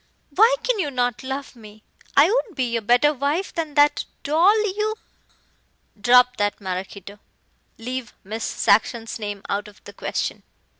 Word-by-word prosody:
"Why 445 +11 +5
can - - 0
you 300 - 0
not 245 -3 -1
love 265 0 -6
me? 215 -2 -15 0.3
I 280 - +8
would 440 -2 -1
be 245 -3 -1
a 230 - 0
better 245 +7 +3
wife 290 +7 -2
than 315 -4 -4
that 290 0 +3 0.2
doll 345 +9 +4 0.2
you 430 +1 -1 0.6
" 205 - -34
"Drop 250 +2 +5
that, 205 0 -1
Maraquito. 195 +1 -6 0.6
Leave 250 0 -5
Miss 220 +3 -5
Saxon's 225 +2 +1
name 205 -2 -5
out 205 +1 -2
of 210 0 -16
the - - -12
question." - - -3
250 Hz, 155 wpm, -22 LUFS, 215-295 Hz, 0.6 s, I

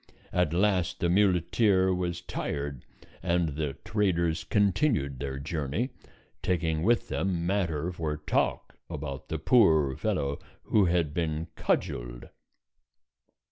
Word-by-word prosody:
At 90 -4 +2
last 90 0 +1
the 85 - +1
muleteer 95 0 +3
was 90 -1 -2
tired, 70 -6 -4 0.4
and 85 -2 +1
the 75 -1 -3
traders 85 -6 +1
continued 100 - +1
their 70 -1 -4
journey, 75 - -2 0.5
taking 80 -3 0
with 115 +6 +2
them 90 -3 -1
matter 85 -4 0
for 80 -4 -3
talk 75 - -1
about 70 -4 -6
the 80 - -1
poor 80 - +4
fellow 70 +2 -1 0.2
who 105 -3 +3
had 85 -4 +1
been 80 0 -2
cudgeled. - - -2
85 Hz, 115 wpm, -28 LUFS, 75-95 Hz, 0.5 s, poor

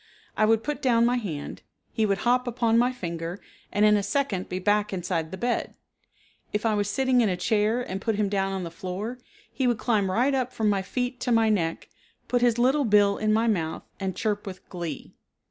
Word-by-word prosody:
I 215 - +3
would 225 0 +3
put 295 +2 -3
down 235 -3 +3
my 245 +1 +2
hand, 165 -11 -5 0.3
he 220 -1 +1
would 195 -1 +1
hop 250 +1 +2
upon 230 -1 +2
my 245 +1 +3
finger 170 -5 -5 0.3
and 205 +1 +3
in 210 0 +6
a 205 - +2
second 205 -5 -1
be 180 - -3
back 205 +2 +1
inside 175 -3 -2
the 190 - -7
bed. 240 +4 -2 0.8
If 210 +2 -2
I 220 - +3
was 205 -1 0
sitting 260 +3 +2
in 220 - +2
a 180 - -1
chair 215 +5 +1
and 195 -4 -5
put 225 -2 0
him 210 0 +1
down 195 -1 0
on 190 -1 -3
the 170 - -6
floor, 190 +8 -5 0.3
he 260 - 0
would 240 -2 +2
climb 215 -4 +1
right 245 +9 +2
up 255 -2 0
from 220 -1 +1
my 195 -1 +1
feet 245 +5 -3
to 250 - -1
my 225 -1 +4
neck, 165 -6 -1 0.4
put 245 -1 +1
his 240 -1 +3
little 265 +4 +3
bill 205 -2 +4
in 215 0 +1
my 220 +2 +3
mouth 170 -8 -1 0.2
and 190 -2 -3
chirp 205 -1 -2
with 185 -1 -8
glee. 170 -6 -6
215 Hz, 220 wpm, -26 LUFS, 190-240 Hz, 0.8 s, in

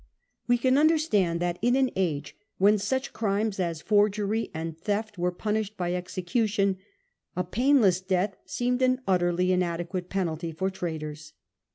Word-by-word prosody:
We 245 0 +4
can 260 +3 +3
understand 295 - +2
that 175 0 -1
in 245 +3 +3
an 265 -1 +2
age 155 -6 -2 0.2
when 205 +2 +4
such 260 +6 -2
crimes 205 -1 -1
as 170 -3 -2
forgery 210 +1 +1
and 160 0 -5
theft 205 +4 -3
were 180 +1 +1
punished 210 +2 -2
by 175 -1 -1
execution, 190 +3 0 0.6
a 180 - 0
painless 220 -2 +3
death 185 +1 0
seemed 250 +1 -1
an 255 0 +2
utterly 180 -1 +2
inadequate 180 0 -1
penalty 170 -3 -2
for 190 +4 -2
traitors. 155 -4 -6
190 Hz, 145 wpm, -27 LUFS, 175-220 Hz, 0.6 s, We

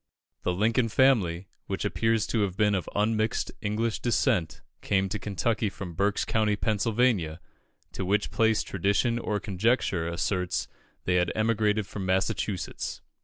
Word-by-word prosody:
The - - 0
Lincoln 115 +6 +1
family, 100 -9 +3 0.2
which 95 +1 -3
appears 110 +4 +1
to 115 - 0
have 95 -2 -1
been 105 -1 +3
of 95 -3 -1
unmixed 110 +1 0
English 110 +2 -1
descent, 115 - 0 0.2
came 95 -1 +1
to 105 - -3
Kentucky 105 +2 -1
from 95 -2 -7
Berks 100 +4 +1
County, 110 -2 +1
Pennsylvania, 105 -5 +1 0.5
to - - -4
which 100 +3 0
place 110 -1 +2
tradition 100 +5 +1
or 105 -3 -1
conjecture 100 -3 0
asserts 90 +1 -1 0.4
they 90 0 +2
had 90 - +2
emigrated 110 -1 +1
from 100 0 -6
Massachusetts. 95 0 -2
105 Hz, 140 wpm, -27 LUFS, 95-110 Hz, 0.5 s, family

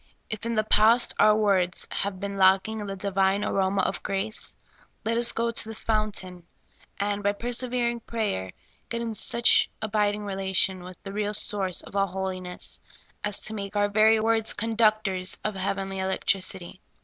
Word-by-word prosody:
If 215 +1 -4
in 235 - -1
the 215 -1 +2
past 220 +3 +4
our 215 0 +6
words 195 -4 +1
have 195 -2 -3
been 200 0 -4
lacking 195 +3 +3
in 205 - -5
the 195 - -4
Divine 195 +1 +1
aroma 190 0 +1
of - - -2
grace, 200 +2 -3 0.5
let 225 +1 +1
us 235 0 +5
go 230 0 -1
to 225 -1 +1
the 225 - -6
fountain 200 -6 -3 0.5
and, 205 0 -1
by 205 0 +1
persevering 240 +1 -1
prayer, 210 - -3 0.4
get 235 - -2
in 230 -1 -3
such 235 +2 +3
abiding 210 -1 0
relation 190 -1 +1
with 180 0 -10
the 195 - -7
real 210 0 0
source 195 -4 +1
of - - -13
all 195 0 +2
holiness 185 -1 -4 0.4
as 205 -1 0
to 215 - -1
make 200 -1 -6
our 205 0 +2
very 220 +2 +5
words 225 0 +1
conductors 215 -4 +1
of 215 - -1
heavenly 195 0 -3
electricity. 190 -1 -2
205 Hz, 165 wpm, -26 LUFS, 190-220 Hz, 0.5 s, our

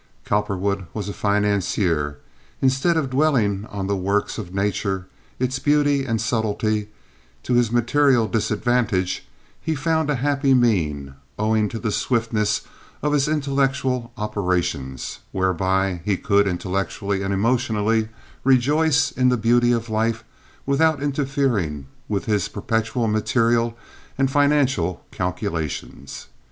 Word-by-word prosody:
Cowperwood 100 -2 -1
was 105 -2 -3
a - - -4
financier. 100 -8 0 0.4
Instead 135 +6 +2
of 140 -5 -1
dwelling 120 -8 +1
on 100 -1 -4
the 100 +1 0
works 100 +4 -1
of 95 -5 -7
nature, 95 -1 -1 0.3
its 130 +1 -1
beauty 145 -1 +2
and 115 -3 -1
subtlety, 110 -1 0 0.6
to 125 - -1
his 120 -2 +3
material 120 0 +3
disadvantage, 110 -3 0 0.3
he 160 - -1
found 160 +1 0
a 145 - +2
happy 140 +1 +2
mean, 80 - +1 0.2
owing 110 0 +1
to 115 - -5
the 110 -1 -2
swiftness 110 -3 0 0.4
of 150 0 +1
his 145 -1 +2
intellectual 135 -4 0
operations, 90 - -2
whereby 95 0 0
he 100 -1 0
could, 100 0 +2
intellectually 95 +1 -2
and 95 0 -2
emotionally, 110 0 +1 0.3
rejoice 145 +4 +3
in 125 -1 +2
the 125 - +2
beauty 120 +2 +3
of 115 -1 0
life 110 0 0 0.4
without 145 +2 +2
interfering 135 - -1 0.2
with 100 -2 -1
his 105 -4 +1
perpetual 115 +3 -1
material 115 +2 +1 0.4
and 135 0 +1
financial 135 - +2
calculations. 85 -6 -4
110 Hz, 120 wpm, -22 LUFS, 100-130 Hz, 0.6 s, his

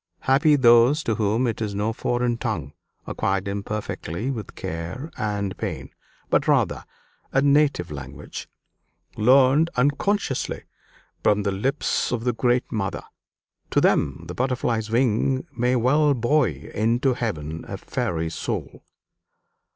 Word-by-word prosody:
Happy 145 +3 +4
those 125 +3 +5
to 115 - 0
whom 110 +3 +1
it 115 -1 -2
is 105 -2 -2
no 105 +3 0
foreign 120 +1 0
tongue, 70 - -4 0.3
acquired 95 0 -1
imperfectly 100 - -4
with 110 -7 -6
care 85 - -5
and 100 -2 -2
pain, - - -4 0.4
but - - +2
rather - - +2 0.5
a 135 - +3
native 140 - +2
language, 70 0 -8 0.7
learned 135 +7 +5
unconsciously 145 +4 0 0.6
from 105 -1 +2
the 100 - 0
lips 130 +10 -1
of 120 -2 -2
the 125 0 +1
great 120 +2 +1
mother. 100 -4 -2 0.7
To - - +2
them 70 +4 +1
the 85 - -6
butterfly's 120 -2 -1
wing 125 +2 +1
may 125 +1 +1
well 140 +4 +3
buoy 120 - 0
into 120 +5 +2
heaven 80 -10 -4
a - - -5
fairy's 80 -1 -3
soul!" - - -4
115 Hz, 130 wpm, -24 LUFS, 100-130 Hz, 0.7 s, those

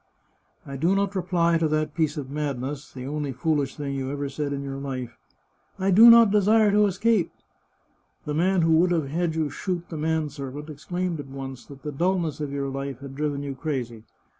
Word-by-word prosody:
" - - -44 0.2
I 140 0 -6
do 170 +8 +2
not 200 0 0
reply 170 -2 +2
to 160 - +2
that 155 0 -1
piece 155 -3 0
of 135 -2 -5
madness, 145 -1 -4
the 130 -1 -8
only 145 0 -3
foolish 145 -1 0
thing 140 -2 -4
you 135 -1 -3
ever 140 0 -3
said 140 +1 -3
in 140 0 -3
your 135 0 -5
life, 130 -4 -5 0.3
* - - -41
I - - +4
do 225 +6 +9
not 230 -3 +8
desire 210 +1 +4
to 210 +1 +4
escape.' 200 0 +1 0.9
The 150 - -2
man 180 +3 +2
who 165 - +3
would 175 +2 +4
have 160 -6 0
had 165 +1 -1
you 155 -3 -1
shoot 175 +2 -3
the 160 - -5
man 160 0 0
servant 145 +1 -7
exclaimed 175 +3 -3
at 145 - -7
once 135 -1 -8
that 140 -1 -13
the 150 - -4
dulness 170 +1 0
of 145 -2 -3
your 140 -1 -2
life 135 -1 -4
had 140 -1 -8
driven 145 0 -2
you 140 -1 -4
crazy. 130 -6 -4
150 Hz, 215 wpm, -25 LUFS, 140-175 Hz, 0.9 s, do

